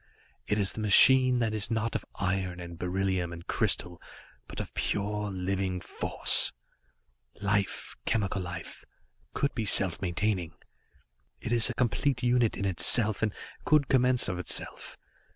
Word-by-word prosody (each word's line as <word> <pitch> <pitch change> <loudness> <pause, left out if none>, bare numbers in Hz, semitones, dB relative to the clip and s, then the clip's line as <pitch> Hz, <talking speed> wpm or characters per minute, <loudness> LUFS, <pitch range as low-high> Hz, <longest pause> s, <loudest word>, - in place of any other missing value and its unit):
It 105 - -1
is 100 -2 +2
the - - -8
machine 125 +5 +6
that 115 -2 -1
is 110 0 -2
not 115 0 -2
of - - -3
iron 90 -1 -3
and 85 -1 -9
beryllium 90 -1 -2
and 85 0 -10
crystal, 90 -1 -1 0.5
but - - -9
of - - -7
pure, 105 +1 -3
living 95 0 -3
force. - - +4 0.9
"Life, 100 0 -2
chemical 100 -3 -1
life, 85 -2 -8 0.5
could 140 - -1
be 115 - -3
self 95 -4 +2
maintaining. 90 -2 -2 0.8
It 115 - -4
is 120 0 +2
a 120 - -5
complete 125 +1 -1
unit 120 -2 +1
in 100 - -3
itself 105 +3 +4
and 110 -1 0 0.3
could 150 -3 +2
commence 125 -1 +3
of 90 -2 -4
itself. 90 - -5
100 Hz, 145 wpm, -28 LUFS, 90-115 Hz, 0.9 s, machine